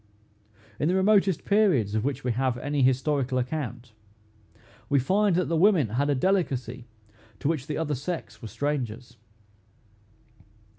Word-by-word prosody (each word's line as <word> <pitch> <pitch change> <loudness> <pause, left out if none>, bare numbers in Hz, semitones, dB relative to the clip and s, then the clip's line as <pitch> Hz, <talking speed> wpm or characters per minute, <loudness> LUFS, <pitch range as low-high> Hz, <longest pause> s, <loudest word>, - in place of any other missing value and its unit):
In 150 - +1
the 180 - +2
remotest 195 -2 +2
periods 185 - +2
of 110 0 0
which 135 0 -3
we 125 - 0
have 125 +1 -1
any 145 +3 -2
historical 130 0 +1
account, 125 -3 -4 1.0
we 140 - +3
find 195 +8 +2
that 180 0 +1
the 165 - -1
women 170 - +4
had 135 +7 0
a 145 - +2
delicacy 130 - -1 0.5
to - - -2
which 150 -4 -1
the 150 - -3
other 155 -2 -1
sex 160 +6 -5
were 115 - -7
strangers. 125 -3 -4
140 Hz, 145 wpm, -26 LUFS, 125-170 Hz, 1.0 s, women